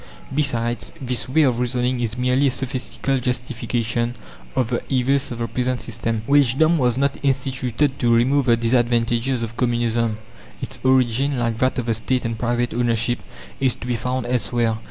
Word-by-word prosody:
Besides, 120 -5 0
this 125 -2 -2
way 155 +4 +4
of 125 -4 +2
reasoning 125 0 0
is 115 -1 -2
merely 125 +3 +2
a - - +4
sophistical 130 +1 -2
justification 120 -1 -2 0.4
of 120 -3 +1
the 120 - 0
evils 135 +1 +2
of 120 - -4
the 115 0 -2
present 125 0 -1
system. 115 -1 -3
Wagedom 145 +4 +4
was 125 -2 +2
not 140 +1 +1
instituted 135 0 0
to 120 -1 +2
remove 130 +4 +3
the 115 -1 +5
disadvantages 120 +1 +1
of 115 0 -5
Communism; 120 -2 0 0.4
its 130 - -7
origin, 130 +1 +2
like 115 -2 -1
that 130 0 +1
of 125 - -1
the 115 - +1
State 125 +3 -1
and 115 0 -1
private 120 0 0
ownership, 120 0 +1 0.4
is 130 -3 +2
to - - -9
be 125 -1 -1
found 125 +2 -2
elsewhere. 120 -1 0
125 Hz, 170 wpm, -22 LUFS, 115-130 Hz, 0.4 s, the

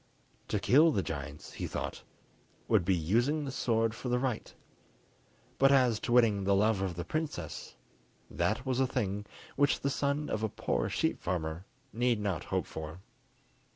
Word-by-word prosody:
To - - 0
kill 150 +7 +6
the 100 -9 0
giants, 75 -1 -6
he - - -4
thought, - - -4 0.7
would - - +4
be 95 +2 +2
using 120 - +1
the 135 - -4
sword 115 -4 +1
for 125 +2 -5
the 125 - +2
right; 125 -3 -2 1.1
but 135 0 +6
as 125 -5 +4
to - - -4
winning 115 -5 +4
the 100 +1 +3
love 105 0 +3
of 95 -3 -2
the 85 - -4
princess, 150 - -4 0.5
that 110 +5 -1
was 130 -1 0
a 130 - +3
thing 100 -2 -2 0.3
which 145 0 +2
the 140 - 0
son 140 +2 0
of 110 - -2
a 110 - 0
poor 60 -9 -1
sheep - - 0
farmer 85 0 -3 0.3
need 120 -1 +1
not 100 -6 -2
hope - - -1
for. 80 +3 -7
110 Hz, 170 wpm, -31 LUFS, 95-130 Hz, 1.1 s, kill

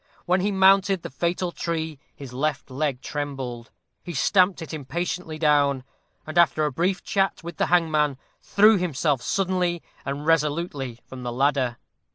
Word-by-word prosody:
When 180 +1 +2
he 205 +2 +1
mounted 195 -1 +4
the - - -6
fatal 175 +4 -1
tree 160 -4 -3 0.2
his 135 -3 -10
left 140 +1 -2
leg 135 -1 -1
trembled; 135 -5 -5 0.3
he 175 -2 -7
stamped 185 +6 +3
it 160 - -9
impatiently 160 +3 -4
down, 145 -4 +2 0.4
and, 155 +2 0
after 155 -2 +4
a 150 - 0
brief 180 +7 0
chat 195 -3 0
with 170 +1 -7
the - - +1
hangman, 155 -5 +2 0.2
threw 210 +1 +5
himself 150 -5 0
suddenly 180 +1 0 0.2
and 140 +2 -4
resolutely 150 -5 0
from 130 -1 -9
the 120 -1 -4
ladder. 130 -1 +1
155 Hz, 155 wpm, -24 LUFS, 140-180 Hz, 0.4 s, threw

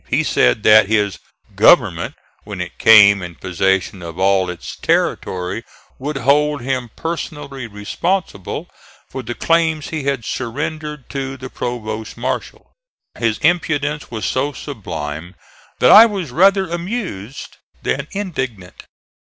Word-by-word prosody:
He - - +1
said 60 - +2
that 110 -1 +7
his 105 -3 0 0.4
"government," - - +4 0.3
when 105 -2 -7
it 90 0 -6
came 100 -3 +7
in 85 -1 -7
possession 95 +1 -1
of 85 -1 -8
all 95 -1 +2
its 90 -1 -7
territory, 90 +4 -1 0.4
would 140 +2 -3
hold 145 +1 +2
him 130 -1 -2
personally 150 -6 -5
responsible 105 - -3 0.4
for 130 - -5
the 120 -1 -6
claims 160 -2 +1
he 155 -4 -4
had 135 -5 -1
surrendered 150 +3 -4
to 135 -1 -4
the 130 0 -9
provost 110 -2 -5
marshal. 125 +2 -4 0.5
His 115 -3 +1
impudence 150 -3 0
was 110 -2 -4
so 140 +3 -1
sublime 80 - -6 0.4
that 125 - +5
I 225 +2 +10
was 190 - -4
rather 195 +5 +4
amused 170 - -5 0.3
than 140 +2 -1
indignant. 135 - -5
130 Hz, 130 wpm, -19 LUFS, 100-150 Hz, 0.5 s, I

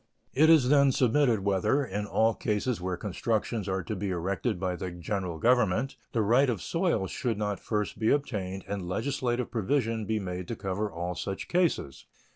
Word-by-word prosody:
It 155 +4 +5
is, 150 -6 +6
then, 140 -1 +5
submitted 125 -3 +3
whether, 100 +8 +1
in 105 -1 -3
all 110 +2 +2
cases 105 0 -1
where 90 0 -2
constructions 105 +2 -2
are 95 -1 -1
to 110 - -4
be 100 0 -3
erected 95 +4 -1
by 90 -1 -1
the 90 +1 -4
General 90 0 -4
Government, 125 +3 +2 0.2
the 115 -3 +1
right 125 +6 +4
of 115 -5 -1
soil 165 - 0
should 115 +2 -2
not 105 -2 -2
first 105 -2 -2
be 110 - +2
obtained 95 -9 -1
and 100 -3 -4
legislative 125 +3 -1
provision 115 -1 0
be 110 0 0
made 90 -2 -5
to 115 - -3
cover 100 +1 -3
all 85 +2 -3
such 95 +2 -5
cases. 175 - 0
105 Hz, 180 wpm, -28 LUFS, 95-125 Hz, 0.2 s, is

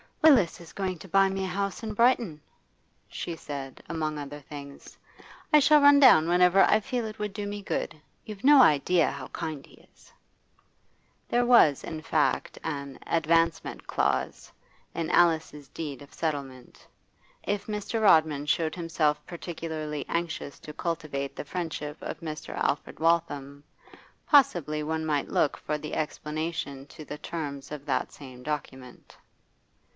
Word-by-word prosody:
'Willis 245 - +5
is 165 - -13
going 190 -2 -3
to 190 - -11
buy 195 +2 +4
me 195 0 -3
a - - -3
house 200 +3 -3
in 215 -1 -4
Brighton,' 230 -9 +2 0.7
she 170 - -5
said, 140 -4 -8
among 155 -2 -3
other 145 0 -7
things. 140 0 -11 0.6
'I 300 - +9
shall 300 +1 +5
run 285 0 +7
down 160 - +7
whenever 180 +2 +5
I 215 - +4
feel 245 0 -3
it 215 0 -7
would 210 -1 -3
do 205 0 -4
me 205 0 -5
good. 175 - -3 0.3
You've 210 -2 -9
no 285 0 +8
idea 165 - +4
how 135 -2 -7
kind 155 -4 -5
he - - -19 0.2
is.' - - -22 1.2
There 245 0 +2
was, 235 - +5
in 155 -1 -6
fact, 155 -1 0
an 140 -4 -5
'advancement 165 0 +1
clause' 70 -2 -1 0.4
in 165 -1 -2
Alice's 160 -4 +2
deed 145 -3 -6
of 140 - -14
settlement. 140 -5 -5 0.6
If 205 0 -2
Mr. 210 +2 -3
Rodman 155 -7 +4
showed 160 +1 +1
himself 165 -3 0
particularly 160 -4 -5
anxious 170 -4 -3
to 150 - -10
cultivate 150 -5 -4
the - - -6
friendship 155 -2 -4
of 160 - -6
Mr. 155 -2 -6
Alfred 145 - -2
Waltham, 145 -4 0 0.6
possibly 175 - +3
one 160 +1 -2
might 150 -2 -1
look 145 - +1
for 150 - -3
the 150 0 -7
explanation 150 -2 -4
to 155 0 -11
the 150 - -7
terms 145 -5 -6
of 145 -2 -7
that 135 -3 -1
same 130 -3 -12
document. 130 -3 -7
160 Hz, 150 wpm, -27 LUFS, 145-190 Hz, 1.2 s, I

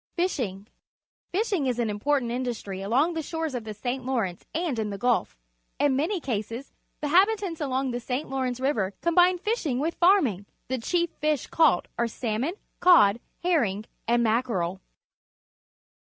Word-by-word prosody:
Fishing. 245 - -1 0.3
— - - -59
Fishing 385 - 0
is 250 -2 0
an 235 -2 0
important 240 +4 0
indus 245 -2 -3
try 195 -2 -6
along 245 - +1
the 325 - -2
shores 320 -1 -3
of 240 -3 -4
the 215 - -5
St. 250 +4 -3
Lawrence 230 -9 -2
and 320 -7 -1
in 215 -1 -1
the 200 - -4
Gulf. 240 - 0 0.4
In 285 -2 +2
many 340 +8 0
cases 235 -1 -4 0.3
the 295 - -1
habitants 385 -1 +3
along 265 -2 0
the 245 - -2
St. 250 +4 -3
Lawrence 260 -2 -2
River 215 -8 0
combine 355 +2 +4
fish 440 +6 -1
ing 250 -4 0
with 315 +5 0
farming. 285 - +3 0.2
The 260 0 -1
chief 345 +7 0
fish 305 -2 -1
caught 310 - +3
are 235 - +2
salmon, 235 - -2 0.2
cod, 235 - +6 0.2
herring, 230 - +1 0.2
and 240 +1 +3
mackerel. 215 -6 0
260 Hz, 165 wpm, -26 LUFS, 225-325 Hz, 0.4 s, cod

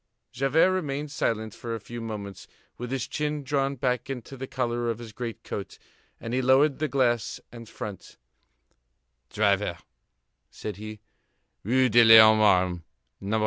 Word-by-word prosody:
Javert 135 +9 +2
remained 150 -5 -3
silent 110 -6 -2
for 115 -1 -5
a - - -6
few 120 +3 -8
moments, 100 -4 -7 0.3
with 125 0 -7
his 130 -1 -3
chin 150 -1 -3
drawn 140 0 -1
back 125 0 -2
into 135 0 -6
the 135 0 -7
collar 120 -2 -2
of 115 - -2
his 115 -2 -10
great 115 0 -6
coat, 100 - -6 0.4
then 115 - -6
he 130 +2 0
lowered 135 +3 +3
the 155 - 0
glass 120 -3 0
and 115 -2 -11
front: 100 -3 -8 1.1
"Driver," 100 -4 +1 0.7
said 105 - -7
he, 110 0 -9 0.6
"Rue 130 +5 +3
de 120 +2 +6
l'Homme 110 -1 +8
Armé, 90 -4 +3 0.4
No. 105 +3 -1
120 Hz, 150 wpm, -26 LUFS, 110-135 Hz, 1.1 s, l'Homme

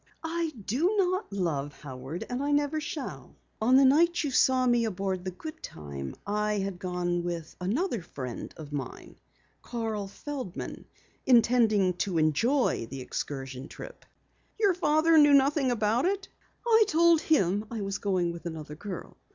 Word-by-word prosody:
"I 330 0 -1
do 330 - +1
not 370 - +1
love 155 -7 -2
Howard, 135 +4 -6
and 245 +2 -3
I 285 - -1
never 290 +1 +1
shall. 300 -2 -6 0.3
On 245 +4 +4
the 270 +1 +7
night 335 +6 +4
you 290 - -1
saw 255 0 +4
me 240 -1 +3
aboard 190 -3 -2
the 185 - -3
Goodtime 75 - -7
I 210 +1 0
had 195 -3 -2
gone 175 -1 -1
with 170 -2 -5
another 235 - -1
friend 130 -7 -7
of 150 -2 -9
mine, 135 -4 -6 0.4
Carl 225 -4 -3
Feldman, 255 -2 -6 0.4
intending 230 -6 +4
to 185 -3 -1
enjoy 160 - +2
the 135 0 -6
excursion 135 +1 -5
trip." - - -10 0.6
"Your 405 -4 +4
father 325 -1 +4
knew 290 -1 +7
nothing 275 0 +3
about 230 +2 +1
it?" 390 +1 -1 0.4
"I 445 -2 +5
told 335 -2 +4
him 205 - +2
I 230 -3 -4
was 195 +1 -3
going 185 -4 0
with 170 0 -7
another 155 -3 -7
girl." 180 +4 -8
210 Hz, 150 wpm, -28 LUFS, 175-290 Hz, 0.6 s, the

